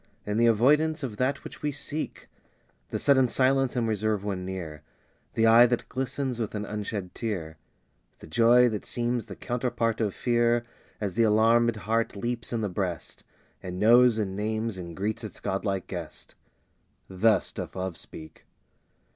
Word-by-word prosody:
In 105 Hz, +1 st, -2 dB
the 120 Hz, +1 st, +4 dB
avoidance 150 Hz, +8 st, +3 dB
of 115 Hz, -6 st, -4 dB
that 135 Hz, +4 st, 0 dB
which -, -, -10 dB
we 150 Hz, -, -1 dB
seek 150 Hz, +2 st, -6 dB, 0.6 s
The -, -, -2 dB
sudden 130 Hz, -2 st, +4 dB
silence 130 Hz, +1 st, +2 dB
and 120 Hz, -2 st, 0 dB
reserve 110 Hz, -1 st, 0 dB
when 95 Hz, -3 st, -3 dB
near 90 Hz, -5 st, -6 dB, 0.5 s
The 115 Hz, -, +3 dB
eye 115 Hz, +2 st, +8 dB
that 120 Hz, 0 st, -1 dB
glistens 130 Hz, -1 st, -3 dB
with 110 Hz, -2 st, -3 dB
an 105 Hz, 0 st, -3 dB
unshed 105 Hz, -3 st, -5 dB
tear 85 Hz, -9 st, -4 dB, 0.6 s
The -, -, -13 dB
joy 120 Hz, +9 st, +5 dB
that 105 Hz, -3 st, -4 dB
seems 120 Hz, -1 st, -2 dB
the -, -, -8 dB
counterpart 120 Hz, -2 st, -1 dB
of 105 Hz, -3 st, -1 dB
fear, 120 Hz, -1 st, +1 dB, 0.3 s
As 100 Hz, -4 st, -3 dB
the 115 Hz, -, +1 dB
alarmed 115 Hz, +2 st, +4 dB
heart 110 Hz, +2 st, -1 dB
leaps 120 Hz, +3 st, -3 dB
in 115 Hz, -2 st, -1 dB
the 105 Hz, -, 0 dB
breast, 90 Hz, -3 st, -4 dB, 0.4 s
And 90 Hz, 0 st, -6 dB
knows 120 Hz, +1 st, +6 dB
and 100 Hz, -3 st, -2 dB
names 110 Hz, +1 st, -2 dB
and 85 Hz, -3 st, -8 dB
greets 105 Hz, +3 st, -2 dB
its -, -, -8 dB
godlike 95 Hz, -1 st, -2 dB
guest 85 Hz, -5 st, -8 dB, 0.7 s
Thus 105 Hz, +4 st, +2 dB
doth -, -, -7 dB
Love 95 Hz, -2 st, -3 dB
speak. 80 Hz, -1 st, -12 dB
110 Hz, 165 wpm, -27 LUFS, 100-120 Hz, 0.7 s, eye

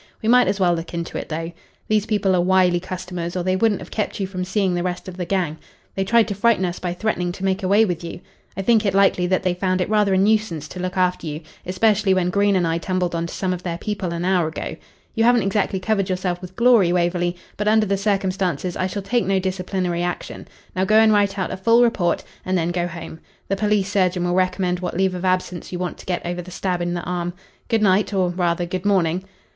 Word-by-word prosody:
We 220 Hz, -, -4 dB
might 250 Hz, +1 st, +5 dB
as 200 Hz, -, 0 dB
well 180 Hz, -2 st, +3 dB
look 170 Hz, 0 st, -5 dB
into 170 Hz, 0 st, -4 dB
it, -, -, -8 dB
though. 165 Hz, +2 st, -4 dB, 0.4 s
These 215 Hz, 0 st, +1 dB
people 200 Hz, -3 st, +2 dB
are 175 Hz, -, +3 dB
wily 180 Hz, -1 st, +3 dB
customers, 180 Hz, -1 st, -5 dB
or 180 Hz, -, -1 dB
they 185 Hz, +1 st, +1 dB
wouldn't 210 Hz, +1 st, +1 dB
have -, -, -10 dB
kept 210 Hz, -1 st, -2 dB
you 195 Hz, -, 0 dB
from 185 Hz, -1 st, -4 dB
seeing 190 Hz, 0 st, 0 dB
the 175 Hz, -, 0 dB
rest 180 Hz, +1 st, -3 dB
of 185 Hz, -, -7 dB
the 180 Hz, -1 st, -4 dB
gang. 170 Hz, -4 st, -1 dB, 0.3 s
They 195 Hz, -, -1 dB
tried 230 Hz, +3 st, +3 dB
to -, -, -1 dB
frighten 205 Hz, -1 st, +2 dB
us 175 Hz, 0 st, -3 dB
by 175 Hz, -1 st, -3 dB
threatening 180 Hz, -3 st, -1 dB
to 195 Hz, -, -5 dB
make 190 Hz, +1 st, 0 dB
away 200 Hz, +4 st, +4 dB
with 175 Hz, -4 st, -3 dB
you. 170 Hz, +1 st, -6 dB, 0.4 s
I 195 Hz, -, -2 dB
think 225 Hz, 0 st, +4 dB
it 195 Hz, -2 st, 0 dB
likely 195 Hz, -2 st, +3 dB
that 185 Hz, +1 st, +1 dB
they 185 Hz, -1 st, +1 dB
found 185 Hz, +1 st, 0 dB
it 180 Hz, -, 0 dB
rather 210 Hz, -3 st, +3 dB
a -, -, +3 dB
nuisance 195 Hz, -6 st, +1 dB
to 185 Hz, -, -8 dB
look 185 Hz, +1 st, -3 dB
after 180 Hz, -2 st, +1 dB
you 150 Hz, +1 st, -5 dB, 0.3 s
especially 200 Hz, +1 st, +2 dB
when 180 Hz, -1 st, +1 dB
Green 200 Hz, +1 st, +2 dB
and 180 Hz, -2 st, +2 dB
I 165 Hz, 0 st, 0 dB
tumbled 180 Hz, 0 st, -1 dB
on 170 Hz, 0 st, -1 dB
to -, -, -8 dB
some 185 Hz, -2 st, -1 dB
of 180 Hz, -, -5 dB
their 170 Hz, -2 st, -3 dB
people 195 Hz, -1 st, -3 dB
an 170 Hz, +1 st, -3 dB
hour 180 Hz, -3 st, +2 dB
ago. 160 Hz, -, -5 dB, 0.4 s
You 225 Hz, -, +1 dB
haven't 240 Hz, -1 st, +4 dB
exactly 195 Hz, 0 st, 0 dB
covered 200 Hz, 0 st, 0 dB
yourself 180 Hz, -1 st, -2 dB
with 185 Hz, 0 st, -10 dB
glory, 235 Hz, -6 st, +5 dB
Waverley, 175 Hz, 0 st, +1 dB, 0.2 s
but 210 Hz, -, -2 dB
under 215 Hz, 0 st, +4 dB
the 200 Hz, -1 st, +1 dB
circumstances 190 Hz, -3 st, -1 dB
I 185 Hz, -, 0 dB
shall 200 Hz, +1 st, -5 dB
take 235 Hz, +2 st, 0 dB
no 195 Hz, 0 st, +2 dB
disciplinary 185 Hz, -2 st, -2 dB
action. 175 Hz, 0 st, -4 dB, 0.3 s
Now 185 Hz, -, +1 dB
go 215 Hz, +3 st, +2 dB
and 220 Hz, -1 st, +6 dB
write 200 Hz, -1 st, +2 dB
out 185 Hz, -, -2 dB
a 190 Hz, -, -4 dB
full 230 Hz, +5 st, +4 dB
report, 190 Hz, -8 st, +1 dB, 0.2 s
and 185 Hz, 0 st, 0 dB
then 170 Hz, 0 st, 0 dB
go 175 Hz, 0 st, -1 dB
home. 165 Hz, -2 st, -8 dB, 0.3 s
The 195 Hz, -, +1 dB
police 205 Hz, -1 st, +1 dB
surgeon 185 Hz, -3 st, +1 dB
will 175 Hz, 0 st, 0 dB
recommend 185 Hz, -1 st, +1 dB
what 180 Hz, -1 st, -4 dB
leave 190 Hz, -1 st, +2 dB
of 180 Hz, +1 st, -4 dB
absence 185 Hz, -2 st, -1 dB
you 180 Hz, -, -3 dB
want 180 Hz, 0 st, -4 dB
to -, -, -13 dB
get 180 Hz, -1 st, -2 dB
over 175 Hz, +1 st, -3 dB
the 180 Hz, -, -11 dB
stab 180 Hz, 0 st, -2 dB
in 175 Hz, 0 st, -1 dB
the 175 Hz, -, -2 dB
arm. 175 Hz, 0 st, -3 dB, 0.3 s
Good 225 Hz, -2 st, +1 dB
night 200 Hz, +1 st, +3 dB
or 185 Hz, -2 st, +2 dB
rather, 175 Hz, -1 st, 0 dB
good 180 Hz, +1 st, -4 dB
morning." 185 Hz, -3 st, +1 dB
185 Hz, 250 wpm, -22 LUFS, 175-200 Hz, 0.4 s, and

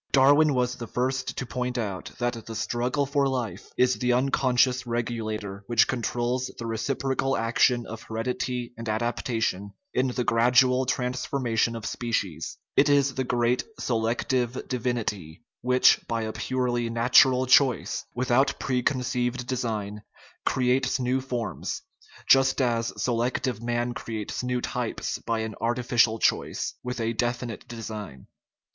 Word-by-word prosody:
Dar 135 Hz, +1 st, +6 dB
win 150 Hz, -1 st, +4 dB
was 125 Hz, -1 st, +1 dB
the 115 Hz, -, -6 dB
first 130 Hz, +3 st, -2 dB
to -, -, -2 dB
point 125 Hz, 0 st, -3 dB
out 100 Hz, -6 st, -4 dB
that 120 Hz, -2 st, -3 dB
the 115 Hz, -, -6 dB
"struggle 125 Hz, +5 st, 0 dB
for 140 Hz, 0 st, +1 dB
life 125 Hz, -5 st, -3 dB
" -, -, -43 dB
is 125 Hz, 0 st, +3 dB
the 125 Hz, -1 st, +2 dB
unconscious 130 Hz, -1 st, +2 dB
regulator 110 Hz, -4 st, -3 dB
which 120 Hz, -1 st, +4 dB
controls 125 Hz, +1 st, -1 dB
the 115 Hz, -, -6 dB
reciprocal 135 Hz, +3 st, -1 dB
action 120 Hz, +1 st, +2 dB
of 115 Hz, 0 st, -8 dB
heredity 120 Hz, +2 st, -3 dB
and 115 Hz, -1 st, -4 dB
adaptation 110 Hz, -3 st, -1 dB, 0.2 s
in 130 Hz, -, +2 dB
the 125 Hz, 0 st, -1 dB
gradual 125 Hz, +2 st, +4 dB
transformation 125 Hz, -2 st, 0 dB
of 115 Hz, -1 st, -6 dB
species; 110 Hz, -10 st, -3 dB, 0.2 s
it 145 Hz, -, +5 dB
is 140 Hz, -1 st, +3 dB
the 130 Hz, -, -1 dB
great 120 Hz, 0 st, +1 dB, 0.2 s
"se 125 Hz, -, -1 dB
lective 120 Hz, +2 st, -1 dB
divinity" 115 Hz, -9 st, -3 dB, 0.2 s
which, 125 Hz, +1 st, +5 dB
by 115 Hz, -1 st, -1 dB
a 110 Hz, -, -3 dB
purely 120 Hz, -2 st, -1 dB
"natural 125 Hz, +2 st, +5 dB
choice," 130 Hz, -1 st, +3 dB
without 130 Hz, +2 st, +2 dB
preconceived 125 Hz, -1 st, -1 dB
design, 110 Hz, -5 st, -3 dB, 0.5 s
creates 130 Hz, +1 st, +2 dB
new 130 Hz, +1 st, 0 dB
forms, 125 Hz, -4 st, -4 dB, 0.4 s
just 135 Hz, 0 st, +5 dB
as 115 Hz, -3 st, +1 dB
selective 120 Hz, 0 st, -1 dB
man 120 Hz, +1 st, -1 dB
creates 110 Hz, -3 st, -4 dB
new 125 Hz, 0 st, -1 dB
types -, -, -3 dB
by 115 Hz, -1 st, -2 dB
an 110 Hz, -1 st, -4 dB
"artificial 120 Hz, -1 st, +2 dB
choice -, -, 0 dB
" -, -, -65 dB
with 125 Hz, 0 st, -4 dB
a 115 Hz, 0 st, 0 dB
definite 120 Hz, -1 st, -3 dB
design. 105 Hz, -, -7 dB
120 Hz, 140 wpm, -26 LUFS, 115-130 Hz, 0.5 s, Dar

